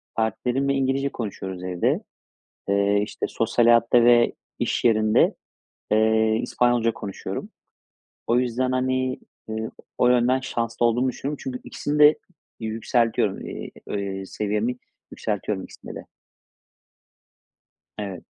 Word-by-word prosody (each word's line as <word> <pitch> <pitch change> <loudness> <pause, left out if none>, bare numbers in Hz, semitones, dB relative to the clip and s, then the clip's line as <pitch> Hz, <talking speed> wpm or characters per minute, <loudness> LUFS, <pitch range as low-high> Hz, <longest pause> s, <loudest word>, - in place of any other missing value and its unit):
Partnerimle 125 +5 0
İngilizce 135 +1 +1
konuşuyoruz 95 -6 -6
evde. 90 -1 0 0.7
Eee, 100 +1 +3
işte, - - -4
sosyal 115 +1 +1
hayatta 115 0 +5
ve 120 -1 +5 0.3
iş - - -1
yerinde, 110 -2 +4 0.6
eee, 110 0 +3
İspanyolca 120 -2 +2
konuşuyorum. 100 -3 -6 0.8
O 120 - +3
yüzden, 125 +1 0
hani, 130 0 0 0.3
eee, 110 0 -3 0.3
o 125 - +4
yönden 125 +1 +3
şanslı 120 -2 -1
olduğumu 120 +3 +2
düşünüyorum. 140 +3 -4
Çünkü 125 -1 -5
ikisini 145 +1 -3
de 150 +1 +7 0.4
yükseltiyoru 115 -2 0
eee, - - -6 0.2
eee, 100 -1 -3
seviyemi 105 +5 -1 0.3
yükseltiyorum 105 -2 -3
ikisinde - - -11
de. - - -8 1.9
Evet. 100 -4 -5
115 Hz, 110 wpm, -24 LUFS, 105-125 Hz, 1.9 s, de